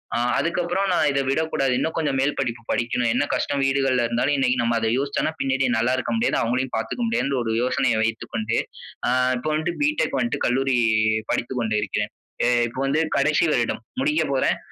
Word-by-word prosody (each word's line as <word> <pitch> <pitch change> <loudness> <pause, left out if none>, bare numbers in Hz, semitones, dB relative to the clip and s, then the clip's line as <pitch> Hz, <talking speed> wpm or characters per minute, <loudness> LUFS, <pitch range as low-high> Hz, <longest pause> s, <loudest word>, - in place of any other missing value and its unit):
அ - - +1 0.2
அதுக்கு 170 +1 0
அப்புறம் 190 +3 0
நான் 155 - +3
இத 140 - 0
விடக்கூடாது 135 -3 0
இன்னும் 160 - -1
கொஞ்சம் 145 -4 0
மேல் 145 +2 +1
படிப்பு 120 -3 -2
படிக்கணும். 120 0 0
என்ன 125 - +1
கஷ்டம் 140 -1 -1
வீடுகள்ல 135 -2 +2
இருந்தாலும், 125 +5 +1
இன்னைக்கி 130 -1 +2
நம்ம 115 0 +1
அத 110 0 0
யோசிச்சோன்னா, 140 +3 -1
பின்னாடி 135 0 +1
நல்லா 120 +3 +1
இருக்க - - -2
முடியாது. 235 - +1
அவுங்களையும் 125 +2 -1
பாத்துக்க 115 - -3
முடியாதுன்ட்டு 140 - 0
ஒரு 110 -1 -1
யோசனைய 125 -2 +1
வைத்துக்கொண்டு, 115 0 -2 0.5
அ - - +2 0.3
இப்ப 140 - -6
வந்துட்டு 165 +3 -2
பி.டெக் 300 +1 0
வந்துட்டு 240 - -1
கல்லூரி, 135 +1 +1 0.5
படித்து 125 +2 -2
கொண்டு 110 -2 0
இருக்கிறேன். - - -3 0.3
அ - - +3 0.2
இப்ப 125 - -8
வந்து 150 +4 +1 0.2
கடைசி 150 +3 +2
வருடம் 120 -1 -1 0.2
முடிக்க 300 +3 +2
போறேன். - - +1
135 Hz, 185 wpm, -23 LUFS, 120-150 Hz, 0.5 s, நான்